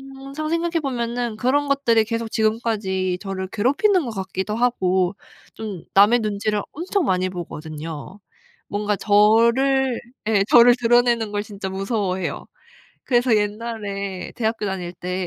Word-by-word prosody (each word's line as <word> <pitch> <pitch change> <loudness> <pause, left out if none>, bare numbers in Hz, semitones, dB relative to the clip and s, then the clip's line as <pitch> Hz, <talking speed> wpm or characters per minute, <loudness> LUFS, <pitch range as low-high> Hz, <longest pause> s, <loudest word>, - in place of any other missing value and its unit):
항상 275 +3 -6
생각해 335 0 0
보면은 240 -3 -2
그런 280 +6 +1
것들이 240 -6 +2
계속 230 0 -3
지금까지 215 -5 0
저를 195 -2 -4
괴롭히는 290 - +2
것 235 - -4
같기도 190 0 -4
하고 190 -6 +1 0.4
좀 205 -6 -6
남의 205 +5 +6
눈치를 210 -1 -1
엄청 360 +3 -1
많이 185 -4 +1
보거든요. 160 0 -7 0.5
뭔가 205 0 -1
저를 235 +6 +3 0.3
예 210 -3 +3
저를 240 0 +8
드러내는 235 -2 +3
걸 205 0 -2
진짜 200 -2 -6
무서워해요. 195 -1 -2 0.6
그래서 245 -2 +3
옛날에 205 -3 -3
대학교 225 -2 -1
다닐 180 -3 -4
때 180 +1 -4
215 Hz, 300 characters per minute, -22 LUFS, 195-245 Hz, 0.6 s, 저를